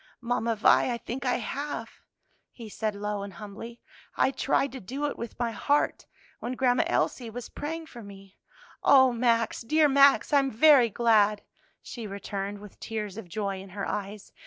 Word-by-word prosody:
"Mamma 235 Hz, -1 st, -1 dB
Vi, 220 Hz, +4 st, +4 dB
I 235 Hz, -, -2 dB
think 255 Hz, +3 st, -5 dB
I 250 Hz, -, +2 dB
have," 255 Hz, -1 st, -5 dB, 0.5 s
he 230 Hz, -3 st, -10 dB
said 215 Hz, 0 st, -3 dB
low 205 Hz, 0 st, -3 dB
and 200 Hz, -1 st, -7 dB
humbly; 210 Hz, +6 st, -10 dB, 0.4 s
"I -, -, +3 dB
tried 275 Hz, 0 st, 0 dB
to 265 Hz, -, -7 dB
do 265 Hz, +9 st, -4 dB
it 290 Hz, -, -2 dB
with 235 Hz, -1 st, -7 dB
my 240 Hz, -1 st, -1 dB
heart, 285 Hz, +6 st, 0 dB, 0.3 s
when 245 Hz, -, -4 dB
Grandma 250 Hz, -1 st, +2 dB
Elsie 240 Hz, -3 st, -1 dB
was 240 Hz, +1 st, -8 dB
praying 325 Hz, +2 st, -5 dB
for 240 Hz, -6 st, -11 dB
me." 195 Hz, -2 st, -14 dB, 0.4 s
"O 260 Hz, -2 st, +6 dB
Max, 230 Hz, -1 st, +1 dB
dear 305 Hz, +6 st, +3 dB
Max, 280 Hz, +1 st, +4 dB
I 285 Hz, -, +7 dB
am 270 Hz, -1 st, 0 dB
very 260 Hz, 0 st, +6 dB
glad!" 215 Hz, -2 st, +2 dB, 0.4 s
she 230 Hz, -3 st, -7 dB
returned 200 Hz, 0 st, -5 dB
with 210 Hz, -2 st, -13 dB
tears 210 Hz, -3 st, -5 dB
of 210 Hz, -5 st, -9 dB
joy 195 Hz, 0 st, -3 dB
in 195 Hz, -, -12 dB
her 200 Hz, +2 st, -5 dB
eyes. 205 Hz, 0 st, -5 dB
230 Hz, 180 wpm, -27 LUFS, 205-260 Hz, 0.5 s, I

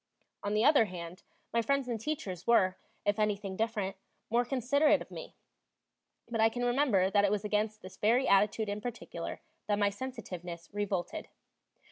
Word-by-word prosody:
On 205 Hz, +1 st, -1 dB
the 215 Hz, -, +3 dB
other 285 Hz, -6 st, +6 dB
hand, 180 Hz, -1 st, -8 dB, 0.3 s
my 235 Hz, -, +3 dB
friends 275 Hz, +3 st, +1 dB
and 230 Hz, -3 st, -3 dB
teachers 195 Hz, -, -4 dB
were, 190 Hz, -6 st, +4 dB, 0.3 s
if 205 Hz, +1 st, +1 dB
anything 205 Hz, -2 st, 0 dB
different, 210 Hz, -3 st, -1 dB, 0.3 s
more 240 Hz, +1 st, +4 dB
considerate 270 Hz, +4 st, +3 dB
of -, -, -10 dB
me; -, -, -8 dB, 0.9 s
but 230 Hz, -1 st, -1 dB
I 225 Hz, -, +6 dB
can 245 Hz, +2 st, -2 dB
remember 240 Hz, -7 st, +3 dB
that 205 Hz, 0 st, +4 dB
it 200 Hz, -, +4 dB
was 210 Hz, +1 st, -1 dB
against 215 Hz, +1 st, -1 dB
this 185 Hz, -, -10 dB
very 240 Hz, +5 st, +3 dB
attitude 210 Hz, +2 st, +3 dB
in 205 Hz, +1 st, -3 dB
particular 240 Hz, +1 st, -6 dB, 0.3 s
that 205 Hz, -1 st, +2 dB
my 205 Hz, -1 st, +3 dB
sensitiveness 180 Hz, -8 st, -7 dB
revolted. 195 Hz, -4 st, -2 dB
210 Hz, 165 wpm, -31 LUFS, 195-240 Hz, 0.9 s, other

